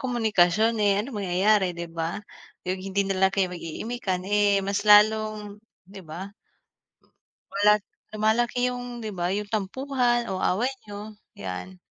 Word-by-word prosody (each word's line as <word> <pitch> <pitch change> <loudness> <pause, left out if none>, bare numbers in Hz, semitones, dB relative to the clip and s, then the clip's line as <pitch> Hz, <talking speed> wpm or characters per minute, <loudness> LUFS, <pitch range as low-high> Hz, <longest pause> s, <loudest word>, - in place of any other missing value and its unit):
komunikasyon, 220 -3 +2
eh, 200 -1 +3
anong 235 +2 -6
mangyayari 190 +1 +2
'di 170 0 -6
ba? 165 +4 -3 0.5
Yung 185 +1 -1
hindi 195 +1 0
na 195 - 0
lang 190 - -2
kayo 190 -2 +1
mag-iimikan, 185 +3 -4
eh, 205 -1 +3
mas 200 +1 -2
lalong 210 0 +4 0.3
'di 200 - -10
ba? 190 +6 -8 1.2
Wala 205 +1 +5 0.4
lumalaki 235 +3 +1
yung, 245 -1 -6
'di 220 -2 -4
ba, 175 - 0
yung 210 0 -4
tampuhan 240 +3 0
o 185 - -3
away 240 +8 +1
niyo, 210 +1 -9 0.2
yan. 100 - -7
205 Hz, 140 wpm, -26 LUFS, 190-220 Hz, 1.2 s, Wala